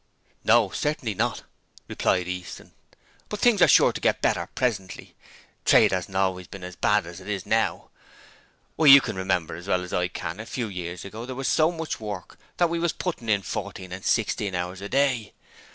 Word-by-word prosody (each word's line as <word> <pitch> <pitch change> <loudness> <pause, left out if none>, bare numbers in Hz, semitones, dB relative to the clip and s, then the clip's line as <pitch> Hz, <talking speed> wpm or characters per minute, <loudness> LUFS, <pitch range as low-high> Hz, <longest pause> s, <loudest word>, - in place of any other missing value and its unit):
'No; 110 -3 +4
certainly 145 -7 -2
not,' - - -1 0.4
replied 90 -1 0
Easton; 90 -1 -7 0.6
'but 210 - -4
things 220 -4 +4
are - - +8
sure - - +6
to - - -6
get - - +2
better - - 0
presently. 105 -8 -3 0.5
Trade - - +5
hasn't 95 +1 -2
always 95 -2 0
been 95 -2 -10
as 90 0 -7
bad - - +2
as 85 +1 -9
it 95 - -10
is 100 -3 -3
now. - - 0 0.9
Why, 155 - +3
you 140 0 +11
can 125 - -4
remember 90 -3 -1
as 90 +3 -10
well 90 -2 +1
as 90 - -8
I 90 0 +1
can 85 +2 -6
a 110 - -7
few 120 -4 -3
years 90 -2 -6
ago 110 +5 -8
there 130 - -5
was 135 +1 -3
so 155 +1 +3
much 165 -2 -5
work 105 -4 -7 0.2
that 175 - +4
we 170 - -1
was 170 -1 0
putting 160 -11 -4
in 100 -2 +2
fourteen 95 0 -6
and 95 +1 -7
sixteen 105 -3 0
hours 90 +1 -4
a 100 - -6
day. 130 -6 +1
100 Hz, 200 wpm, -25 LUFS, 90-125 Hz, 0.9 s, you